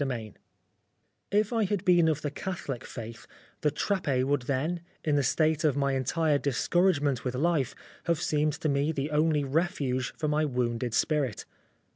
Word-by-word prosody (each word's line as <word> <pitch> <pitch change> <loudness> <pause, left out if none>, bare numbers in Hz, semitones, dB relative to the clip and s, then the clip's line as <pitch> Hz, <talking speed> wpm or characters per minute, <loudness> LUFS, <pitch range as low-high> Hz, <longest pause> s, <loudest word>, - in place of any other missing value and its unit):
207 115 -7 -3 1.0
XVIII 205 - +3
IF 215 +3 -5
I 225 -1 +2
had 200 0 -2
been 175 -3 +5
of 155 -2 0
the 145 - -2
Catholic 145 -7 -5
faith, 115 -1 -8 0.3
the 150 - +3
Trappe 150 -4 0
would 140 +1 +1
then, 155 +6 0 0.2
in 150 -2 +1
the 145 - +3
state 155 +4 +2
of 145 -3 +2
my 140 -1 +1
entire 145 +3 +1
discouragement 145 0 +1
with 125 -1 -2
life, 150 -1 +1 0.3
have 170 -2 +1
seemed 150 0 +1
to - - 0
me 140 +1 +1
the 145 0 -3
only 150 -1 +2
refuge 135 -4 0
for 155 - -1
my 150 +1 +2
wounded 125 -4 -1
spirit. 140 -5 0
145 Hz, 170 wpm, -28 LUFS, 130-160 Hz, 1.0 s, been